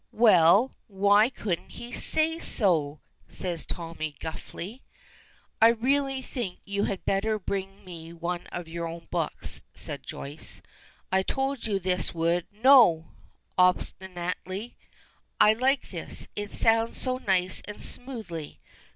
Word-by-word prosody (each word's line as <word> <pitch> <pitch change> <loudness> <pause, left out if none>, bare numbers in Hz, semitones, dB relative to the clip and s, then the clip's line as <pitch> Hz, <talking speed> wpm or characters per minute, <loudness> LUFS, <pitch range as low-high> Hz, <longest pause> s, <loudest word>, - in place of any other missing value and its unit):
"Well, 210 +1 +6
why 205 +2 +4
couldn't 195 -9 -4
he 240 +1 -8
say 320 +5 +1
so?" 155 - +1 0.3
says 175 -3 -4
Tommy, 165 -3 -4
gruffly. 185 +8 -7 0.8
"I 225 - +9
really 265 +3 +1
think 235 -9 -4
you 200 0 -1
had 195 - -4
better 215 +3 +1
bring 195 0 -5
me 165 -2 -9
one 170 +1 -4
of 175 -2 -6
your 170 +1 -4
own 165 0 -8
books," 170 -3 -2
says - - -6
Joyce. 145 +3 -8 0.5
"I 190 0 +4
told 270 +4 -2
you 205 -2 +1
this 180 -3 0
would 170 +1 +1
" - - -47
"No," 225 - +7 0.5
obstinately, 185 +3 0 0.6
"I 210 - +7
like 260 +4 +1
this. 170 -4 -5
It 205 0 -4
sounds 225 +1 +2
so 255 -1 -1
nice 185 -4 +1
and 210 - -7
smoothly. 215 - -6
190 Hz, 130 wpm, -27 LUFS, 170-230 Hz, 0.8 s, I